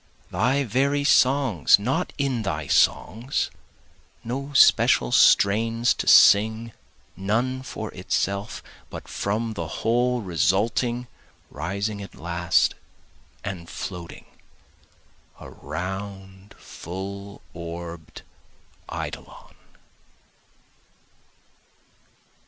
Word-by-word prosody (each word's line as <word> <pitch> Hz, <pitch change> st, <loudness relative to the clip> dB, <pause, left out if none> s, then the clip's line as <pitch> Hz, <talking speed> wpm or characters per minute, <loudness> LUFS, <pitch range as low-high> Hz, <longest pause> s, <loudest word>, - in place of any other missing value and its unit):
Thy 135 Hz, +3 st, +1 dB
very 140 Hz, +4 st, 0 dB
songs 130 Hz, -, +4 dB
not 120 Hz, +7 st, -2 dB
in 135 Hz, -4 st, -1 dB
thy 80 Hz, -7 st, -3 dB
songs, 115 Hz, -, +1 dB, 0.7 s
No 135 Hz, +4 st, -5 dB
special 65 Hz, -, +5 dB
strains 115 Hz, -, +4 dB
to -, -, -5 dB
sing, 110 Hz, +3 st, +5 dB, 0.4 s
none 115 Hz, +8 st, -1 dB
for 110 Hz, -4 st, -7 dB
itself, 100 Hz, +2 st, -3 dB, 0.3 s
But -, -, -9 dB
from 110 Hz, +3 st, -2 dB
the 105 Hz, -, -5 dB
whole 120 Hz, +2 st, 0 dB
resulting, 110 Hz, +7 st, 0 dB, 0.5 s
rising 100 Hz, +6 st, -3 dB
at 100 Hz, -, -10 dB
last 85 Hz, 0 st, +1 dB, 0.7 s
and 95 Hz, -4 st, -6 dB
floating, 90 Hz, -3 st, -7 dB, 1.1 s
A -, -, -11 dB
round 95 Hz, +4 st, -7 dB
full 100 Hz, +3 st, -8 dB
orb'd 85 Hz, -1 st, -8 dB, 0.7 s
eidolon. -, -, -7 dB
100 Hz, 80 wpm, -24 LUFS, 90-120 Hz, 1.1 s, special